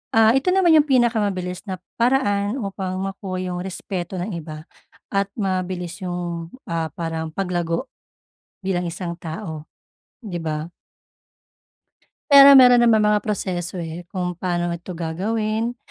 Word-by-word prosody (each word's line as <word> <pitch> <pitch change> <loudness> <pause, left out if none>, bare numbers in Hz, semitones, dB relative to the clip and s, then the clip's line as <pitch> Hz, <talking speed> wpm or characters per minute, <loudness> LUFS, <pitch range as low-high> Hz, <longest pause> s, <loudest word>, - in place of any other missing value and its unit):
ah, 225 0 +6
ito 365 - 0
naman 360 -4 +5
yung 300 - +5
pinakamabilis 205 -8 +1
na 185 -1 -4 0.2
paraan 225 -3 +2
upang 190 -2 -4
makuha 195 -1 -4
yung 175 - -3
respeto 185 -1 -5
ng 195 +3 -4
iba 155 -1 -8 0.5
at 195 0 +2
mabilis 185 -2 -3
yung, 175 -2 -4 0.2
ah, 165 -1 -1
parang 160 -1 -4
paglago, 180 +4 -2 0.7
bilang 185 -2 -1
isang 170 0 -5
tao, 160 -2 -6 0.6
di 195 -7 -5
ba? 155 0 -4 1.6
Pero 280 0 +10
mayro'n 250 -2 +8
naman 220 -3 +4
mga 210 0 +3
proseso, 185 -4 -3
eh, 165 0 -5
kung 180 -2 -3
paano 175 -1 -2
ito 170 +1 -7
gagawin, 215 +8 -2
185 Hz, 130 wpm, -22 LUFS, 170-215 Hz, 1.6 s, Pero